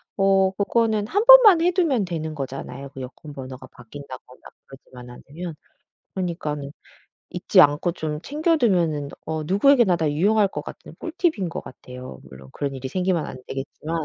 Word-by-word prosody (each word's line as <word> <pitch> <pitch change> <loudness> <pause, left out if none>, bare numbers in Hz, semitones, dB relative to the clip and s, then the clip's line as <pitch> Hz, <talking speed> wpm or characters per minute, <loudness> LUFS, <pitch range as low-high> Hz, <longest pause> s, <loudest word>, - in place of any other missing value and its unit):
어 195 -1 +3
그거는 210 +1 0
1 410 - 0
번만 475 -8 +9
해 350 +2 +3
두면 325 - +1
되는 160 -3 -5
거잖아요 135 -1 -7
그 135 - -8
여권번호가 130 -1 -9
바뀐다거나 130 +1 -12 0.3
그러지만 125 -2 -14 0.2
않으면. 165 +3 -7 0.6
그러니까는 155 -6 -4 0.6
잊지 - - +3
않고 150 +4 +3
좀 155 -3 -4
챙겨 315 +3 0
두면은 170 - +1 0.2
어 160 0 -3
누구에게나 205 - +4
다 160 -3 0
유용할 200 +7 +2
것 - - -6
같은 - - -11
꿀팁인 325 - -1
것 - - -5
같아요. 125 - -11
물론 65 0 -14
그런 140 -1 -4
일이 130 0 -6
생기면 180 +1 -1
안 - - -8
되겠지만 155 +4 -5
165 Hz, 350 characters per minute, -23 LUFS, 140-210 Hz, 0.6 s, 번만